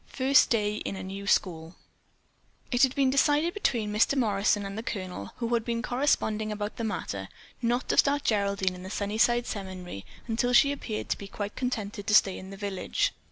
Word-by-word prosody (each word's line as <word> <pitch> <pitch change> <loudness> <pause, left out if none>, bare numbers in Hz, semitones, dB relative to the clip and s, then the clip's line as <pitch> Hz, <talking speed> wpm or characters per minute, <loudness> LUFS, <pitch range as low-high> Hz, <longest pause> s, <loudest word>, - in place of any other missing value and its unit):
FIRST 270 +1 +4
DAY 210 -2 +1
IN 200 - -4
A 190 - -6
NEW 195 +1 -7
SCHOOL 165 -4 0 1.0
It 245 -1 +2
had 265 -1 +4
been 270 -2 +3
decided 295 +5 +3
between 230 - -1
Mr. 215 +6 +3
Morrison 205 -3 +2
and 195 0 -6
the 220 - -3
Colonel, 185 - -5
who 235 0 -2
had 235 -1 +2
been 230 0 -2
corresponding 220 -5 0
about 210 0 -4
the 230 - -3
matter, 100 - -4 0.3
not 240 +1 0
to - - +1
start 285 0 +4
Geraldine 200 -3 +1
in 180 - -9
the 185 - -7
Sunnyside 220 +4 +1
Seminary 185 - -6 0.2
until 245 +2 0
she 280 +3 +6
appeared 225 -6 -4
to - - -1
be 200 - -7
quite 205 +1 -5
contented 215 -5 -3
to 210 - +4
stay 195 -3 +4
in 190 - -10
the 195 - -9
village. 200 -2 -1
215 Hz, 195 wpm, -28 LUFS, 195-245 Hz, 1.0 s, she